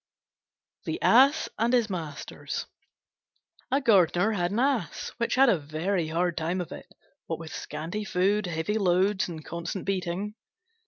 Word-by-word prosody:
THE - - -3
ASS 275 +6 +5
AND 235 +2 +2
HIS 240 -3 +4
MASTERS 165 -7 -5 1.0
A 270 - +3
Gardener 195 - +4
had 175 -5 0
an 205 - -3
Ass 250 - 0
which 235 -1 0
had 270 +1 +6
a 195 -8 +4
very 160 +4 -1
hard 170 +2 0
time 170 +3 -1
of 175 - -5
it, - - -10 0.4
what 165 - -2
with 160 0 -9
scanty 165 +8 -5
food, 195 +1 +1
heavy 175 +6 -1
loads, 190 +1 +2
and 160 -3 -8
constant 170 +3 -5
beating. 195 +1 -2
185 Hz, 150 wpm, -27 LUFS, 170-210 Hz, 1.0 s, had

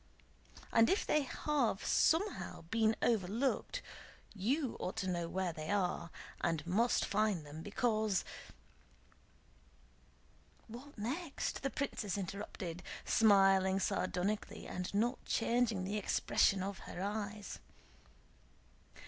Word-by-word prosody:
And 225 0 +6
if 390 - +2
they 300 - +3
have 275 -6 0
somehow 375 +5 +2
been 225 -1 +3
overlooked, 235 - 0 0.5
you 250 +7 0
ought 180 - -3
to 195 -4 -1
know 170 -2 -1
where 185 -2 -1
they 155 0 -6
are, 180 -4 0 0.3
and 160 -3 0
must 220 +8 +2
find 205 -6 +1
them, 150 +2 -8
because..." 215 -1 0 2.4
"What 250 +5 -11
next?" 275 +9 -3
the 275 - 0
princess 215 -9 -2
interrupted, 185 -2 -5 0.2
smiling 195 -3 +5
sardonically 195 +2 -1
and 180 0 -4
not 230 +5 0
changing 230 -4 +1
the 200 +3 -2
expression 195 -1 +2
of 195 0 -4
her 180 - -6
eyes. 205 0 -4
205 Hz, 105 wpm, -35 LUFS, 190-235 Hz, 2.4 s, And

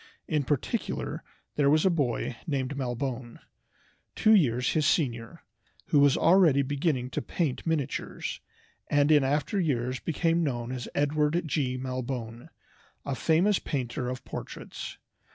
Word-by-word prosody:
In 150 -2 +1
particular 145 -2 -2 0.3
there 140 -1 +4
was 155 +3 +4
a 190 - +5
boy 130 -6 -1
named 140 -2 -1
Malbone, 125 -2 -4 0.8
two 220 - +5
years 125 - +3
his 155 -3 +2
senior, 125 +1 -1 0.5
who 145 - +4
was 140 -1 +5
already 165 -6 +5
beginning 135 -2 -1
to - - -2
paint 160 -3 -2
miniatures, 150 -5 -2 0.5
and 145 +1 +3
in 150 -2 +6
after 145 +8 0
years 130 -6 0
became 165 +1 +1
known 120 -5 -2
as 125 -2 -5
Edward 150 +3 +1
G. 135 -4 -1
Malbone, 125 0 -5 0.6
a 140 - -2
famous 170 +8 +2
painter 125 -2 -3
of 130 0 -6
portraits. - - -7
140 Hz, 135 wpm, -28 LUFS, 125-155 Hz, 0.8 s, in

